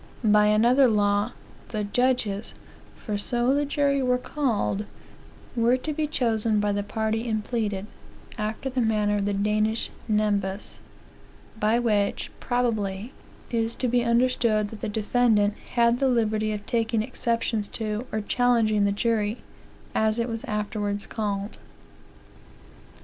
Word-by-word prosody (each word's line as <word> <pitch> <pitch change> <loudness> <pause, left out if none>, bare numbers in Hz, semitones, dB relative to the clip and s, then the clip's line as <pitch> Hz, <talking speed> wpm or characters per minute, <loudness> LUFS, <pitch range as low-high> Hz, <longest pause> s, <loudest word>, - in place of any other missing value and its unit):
* - - -23
*By 210 -1 +5
another 240 +6 +5
law, 205 0 +2 0.3
the 215 -2 -3
judges, 220 -1 0 0.4
for 210 -3 -4
so 240 +4 +1
the 290 +1 +1
jury 280 -1 +1
were 250 -1 +2
called, 235 -7 -1 0.7
were 235 +2 +3
to 305 +4 -4
be 305 +1 -1
chosen 225 -6 +1
by 205 0 +1
the 205 0 0
party 220 +2 -2
impleaded, 210 -2 -2 0.5
after 215 +5 -3
the 260 -1 -1
manner 210 -2 +1
of 200 - -1
the 205 - 0
Danish 215 +2 0 0.2
nem 210 -2 +2
bas; 190 +1 -5 0.8
by 215 +2 +3
which, 210 -4 0
probably, 225 -3 -1 0.4
is 230 -1 0
to 255 - -1
be 245 0 +2
understood 235 -3 +2
that 220 - -10
the - - -2
defendant 210 -1 +2 0.2
had 235 0 +4
the 270 - +3
liberty 215 -3 +1
of 210 -1 -5
taking 225 -2 0
exceptions 230 -2 -1
to, 220 +3 -4
or 215 - -1
challenging 220 -2 +2
the 200 - +2
jury, 215 +1 0 0.6
as 220 0 +2
it 235 0 0
was 225 -2 -4
afterwards 210 -1 -2
called." 205 -2 -3
220 Hz, 140 wpm, -26 LUFS, 210-240 Hz, 0.8 s, By